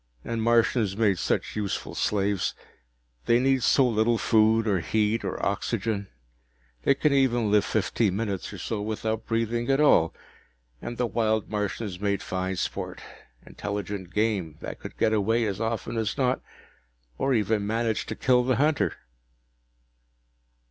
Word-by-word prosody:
And 115 -1 -2
Martians 115 -3 +2
made 100 -5 +2
such - - -1
useful 105 -2 -3
slaves 100 -2 0 0.7
they 115 - +5
need 135 0 +2
so 130 +2 +4
little 115 0 +2
food 110 0 +3
or 100 -4 +2
heat 110 +5 0
or - - -3
oxygen, 100 0 -1 0.7
they 140 - +3
can 150 +1 +2
even 120 -5 +2
live 105 -1 +4
fifteen 105 -1 0
minutes 100 -4 -3
or - - -8
so 110 -2 -3
without 110 +1 -3
breathing 115 +1 -1
at 135 +1 +3
all. 85 - +5 0.7
And 120 0 -6
the 125 - +1
wild 110 -1 0
Martians 105 -2 -3
made 100 -1 -1
fine 95 0 -2
sport - - -4 0.5
intelligent 100 -3 -5
game, 105 -7 -1
that - - -7
could - - -9
get 110 -1 +2
away 110 +2 +2
as 100 0 -3
often 115 +1 -2
as 110 -2 -1
not, 130 -1 +1 0.8
or 135 -1 +2
even 105 -1 +1
manage 115 0 -1
to - - -4
kill 125 -1 +3
the 130 0 +1
hunter." 140 - +1
110 Hz, 150 wpm, -26 LUFS, 100-115 Hz, 0.8 s, they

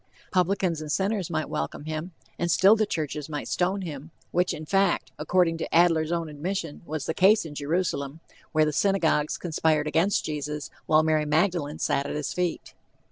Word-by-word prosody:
"Publicans 185 -3 +1
and 155 -1 -5
sinners" 195 -1 0
might 155 -2 -2
welcome 145 - -4
him, 155 +3 -4 0.3
and 175 - 0
still 190 +5 +6
the 215 -1 +1
churches 150 -4 -3
might 150 -1 -4
stone 190 +2 0
him, 150 -3 -7 0.2
which 180 +1 +1
in 155 - -6
fact, 190 -7 +1
according 165 +1 +2
to - - -4
Adler's 165 -2 +4
own 170 -1 -1
admission, 160 +1 -4
was 155 -2 -3
the 160 - -1
case 195 +2 +4
in 155 - -7
Jerusalem, 150 -1 -2 0.3
where 155 -1 +3
the 150 - -1
synagogues 165 -5 +1
conspired 160 -3 +1
against 170 +6 +1
Jesus, 150 -1 -4 0.2
while 155 0 +5
Mary 155 -1 +2
Magdalene 155 -1 +1
sat 140 +1 0
at - - -4
his 150 -2 -3
feet. 180 -2 -2
160 Hz, 180 wpm, -26 LUFS, 150-180 Hz, 0.3 s, still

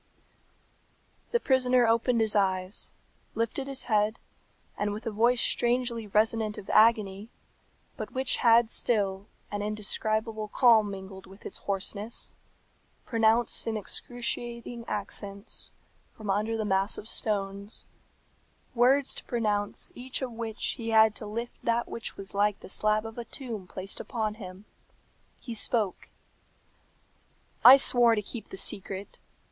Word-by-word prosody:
The 475 - +2
prisoner 255 - +3
opened 230 +1 +2
his 220 -1 +5
eyes, 190 0 0 0.4
lifted 230 +4 -1
his 275 -1 -2
head, 215 -1 +1 0.6
and, 205 0 -1
with 215 - -7
a 225 - -2
voice 235 +3 +3
strangely 240 -2 +1
resonant 215 +1 +1
of 195 - -6
agony, 215 -2 +3 0.7
but - - -6
which 260 0 0
had 230 -1 +5
still 200 -3 0 0.2
an 205 0 -3
indescribable 215 +1 -1
calm 220 -2 +5
mingled 190 -1 -9
with 195 +2 -16
its - - -6
hoarseness, 200 +3 -3 0.7
pronounced 225 0 +2
in 220 -1 -1
excruciating 235 +1 -4
accents, 200 0 -4 0.5
from 210 -3 -3
under 215 +3 0
the 215 - -2
mass 195 0 +1
of 210 - -8
stones, 200 -1 -1 0.9
words 260 +3 +3
to - - -4
pronounce 210 -4 -1
each 260 +2 -5
of 255 - -3
which 225 -1 -6 0.2
he 230 -1 -4
had 220 -1 +6
to 210 - -8
lift 230 +3 -6
that 235 0 +1
which 230 - -6
was 195 0 -6
like 205 0 +1
the - - -10
slab 215 +2 +1
of 225 +1 -7
a 235 - -5
tomb 225 -8 -6
placed 190 +2 -7
upon 220 -4 -2
him. 185 +1 -9 0.7
He 240 - -7
spoke, 220 -3 -1 1.5
"I 260 +2 +11
swore 240 -3 +5
to 210 - -2
keep 225 +2 -8
the - - -7
secret. 195 0 -3
220 Hz, 135 wpm, -28 LUFS, 205-235 Hz, 1.5 s, I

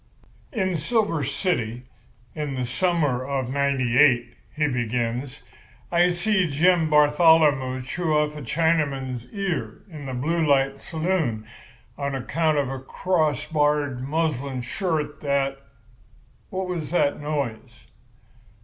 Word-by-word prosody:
"'In 190 - 0
Silver 165 -2 0
City, 125 - -2 0.5
in 150 -3 -4
the 130 -1 -2
summer 145 -2 0
of 135 -2 -2
'98,' 130 -2 +3 0.2
he 150 0 +1
begins, 125 +2 -2 0.5
'I 175 +1 +4
see 180 0 +1
Jim 165 +2 +3
Batholomew 150 -3 +4
chew 165 +5 -2
off 150 0 0
a 150 - -7
Chinaman's 140 -4 0
ear 175 - -3
in 150 -3 -8
the 130 - -4
Blue 165 +6 0
Light 135 -2 +2
Saloon 160 -11 -1 0.5
on 140 -1 -2
account 155 +4 0
of 140 -2 0
a 135 - -4
crossbarred 150 -3 0
muslin 140 -3 -2
shirt 150 +1 -2
that—what 135 +5 -5
was 170 -4 -4
that 160 -4 +1
noise? 135 -5 -4
145 Hz, 115 wpm, -24 LUFS, 130-165 Hz, 0.5 s, I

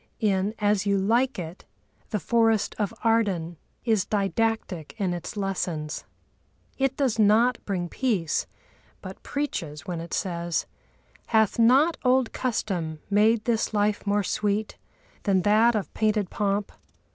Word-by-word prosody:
In 200 0 +1
As 205 -1 +1
You 200 0 +3
Like 235 +7 +2
It 175 0 -7 0.5
the 210 - -1
forest 225 -1 +2
of 205 -2 0
Arden 195 -8 +1 0.3
is 220 -5 +2
didactic 205 -5 -1
in 190 -4 0
its 175 +4 -6
lessons. 175 -6 -3 0.7
It 270 0 +1
does 260 -6 0
not 225 +4 +4
bring 180 -4 -2
peace, 195 - -1 0.6
but - - -9
preaches, 170 - -4
when 175 -2 -4
it 170 - -5
says: 170 -2 -2 0.6
Hath 220 -1 +2
not 270 +8 +5
old 255 -2 +2
custom 185 -10 -2
made 215 +2 +3
this 225 -2 0
life 205 0 +1
more 205 0 +2
sweet 210 +2 -1 0.5
Than 190 -3 +2
that 220 +3 +4
of 210 - -3
painted 215 -3 0
pomp? 200 0 -1
210 Hz, 135 wpm, -26 LUFS, 185-225 Hz, 0.7 s, not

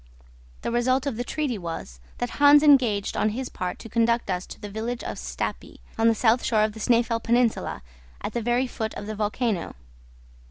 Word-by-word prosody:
The - - -2
result 255 +3 +1
of 275 -5 -2
the 240 - -2
treaty 260 -4 -2
was, 165 - -6 0.2
that 245 - -3
Hans 290 +1 +8
engaged 245 -9 +4
on 215 - +2
his 260 -1 -3
part 180 -1 -4
to - - -10
conduct 230 -1 +1
us 180 0 -3
to - - -10
the 210 - -7
village 225 +4 -4
of - - -5
Stapi, - - -5 0.2
on 225 0 +3
the 225 - +4
south 230 +2 +3
shore 215 -2 +2
of 215 0 0
the 220 - -10
Snæfell 230 0 +2
peninsula, 235 - +1 0.4
at - - -5
the 235 - -1
very 240 +3 +1
foot 220 -3 -4
of 205 - -6
the 215 - -4
volcano. 210 -2 -2
230 Hz, 200 wpm, -25 LUFS, 215-245 Hz, 0.4 s, Hans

